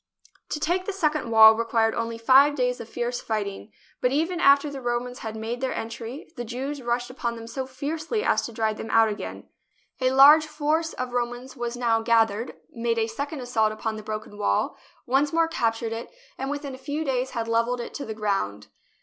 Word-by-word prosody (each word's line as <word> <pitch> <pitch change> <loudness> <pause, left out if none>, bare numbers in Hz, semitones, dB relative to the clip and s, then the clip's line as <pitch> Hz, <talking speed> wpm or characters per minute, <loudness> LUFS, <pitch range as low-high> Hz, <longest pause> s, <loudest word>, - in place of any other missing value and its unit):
To 300 - -3
take 355 +5 0
the 405 - -3
second 305 -8 0
wall 220 -1 +9
required 225 0 +1
only 230 0 -3
five 270 +5 +5
days 250 -2 0
of 230 - -9
fierce 240 +1 -3
fighting, 210 -1 -4 0.3
but 250 - +2
even 330 +5 0
after 280 -1 +5
the 275 -2 -7
Romans 245 +1 -2
had 220 -1 -6
JERUSALEM 220 - -6
made 235 +3 -4
their 260 - -1
entiy, 230 +4 -7
the 240 - -5
Jews 265 +5 -4
rushed 240 0 -1
upon 235 -2 -3
them 230 0 -8
so 260 +3 -5
fiercely 315 - -3
as - - +2
to - - -9
drive 220 -1 -1
them 225 - -6
out 225 0 +5
again. 210 - -6 0.5
A 255 -1 +2
large 290 +4 +7
force 310 +2 -1
of 255 -1 -5
Romans 245 +1 -3
was 240 -1 -4
now 230 -2 +2
gathered, 225 0 +2 0.2
made 230 -1 -1
a 225 - +2
second 280 +6 -5
assault 225 -3 +1
upon 220 0 -3
the 215 - -6
broken 215 -1 -6
wall, 205 - +1 0.3
once 275 +4 +2
more 330 0 +3
captured 225 -6 -1
it, 225 +1 -6 0.3
and 270 +1 -4
within 285 -1 -4
a 260 - -9
few 290 +4 -3
days 260 -1 -1
had 230 -1 -1
levelled 230 +2 +1
it 235 - -6
to 285 - -5
the 220 -3 -6
ground. 195 - -2
245 Hz, 210 wpm, -25 LUFS, 225-280 Hz, 0.5 s, wall